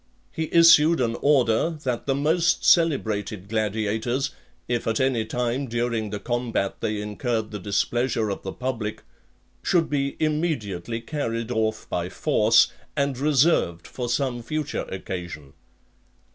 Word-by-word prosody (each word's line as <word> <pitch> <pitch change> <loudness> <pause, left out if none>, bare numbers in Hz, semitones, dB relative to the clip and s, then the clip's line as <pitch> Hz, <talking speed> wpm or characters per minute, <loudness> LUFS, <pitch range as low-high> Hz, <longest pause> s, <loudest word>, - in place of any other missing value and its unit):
He 160 -1 -3
issued 165 -1 +6
an 115 -2 0
order, 140 +2 +2
that 125 -1 -2
the 135 - +2
most 165 +4 +2
celebrated 110 - +2
gladiators, 110 +4 -1 0.4
if 120 -1 -1
at 110 -1 +1
any 130 -4 +1
time 125 +4 -2
during 115 -2 -1
the 105 0 -4
combat 120 -5 -2
they 105 -1 -2
incurred 110 +1 -2
the 105 - -5
displeasure 110 +3 0
of 100 - -5
the 95 - -5
public, 115 -4 -4 0.6
should 165 -4 +1
be 140 -1 0
immediately 125 - -1
carried 115 -4 -3
off 110 -2 -1
by 90 0 -2
force, 115 -2 +3 0.2
and 140 -1 +1
reserved 140 - +2
for 125 -2 -5
some 125 -1 -1
future 155 +4 -3
occasion. 85 -6 -6
120 Hz, 130 wpm, -24 LUFS, 110-140 Hz, 0.6 s, issued